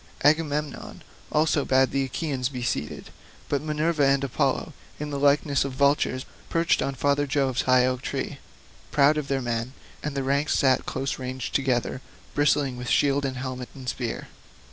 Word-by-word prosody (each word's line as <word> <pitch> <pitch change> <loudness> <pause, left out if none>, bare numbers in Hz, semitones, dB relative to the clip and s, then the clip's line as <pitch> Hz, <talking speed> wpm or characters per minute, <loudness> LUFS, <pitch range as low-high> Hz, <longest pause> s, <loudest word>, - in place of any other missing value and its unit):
Agamemnon 150 -1 0 0.3
also 155 -1 +2
bade 130 0 +3
the 135 0 +1
Achaeans 130 -2 -2
be 125 -3 -5
seated. 75 - -3 0.4
But 140 - 0
Minerva 155 0 0
and 135 0 +3
Apollo, 135 - 0 0.3
in 150 0 -4
the 140 - -2
likeness 140 0 +3
of 135 -1 -4
vultures, 140 -1 +2 0.2
perched 165 0 +2
on 135 - -1
father 145 +2 +1
Jove's 135 -2 +1
high 130 -1 +4
oak 130 0 -1
tree, - - -4 0.5
proud 145 +1 +4
of 150 -2 -2
their 135 -2 -1
men; 120 +1 -2 0.3
and 145 -2 -4
the 135 - 0
ranks 140 +2 +1
sat 130 -2 +3
close 135 0 -2
ranged 130 -1 -4
together, 130 -2 0 0.3
bristling 145 -3 +2
with 125 0 -5
shield 140 0 +3
and 130 -1 -3
helmet 130 -1 -5
and 130 -2 -10
spear. 120 -1 -3
135 Hz, 165 wpm, -26 LUFS, 130-145 Hz, 0.5 s, high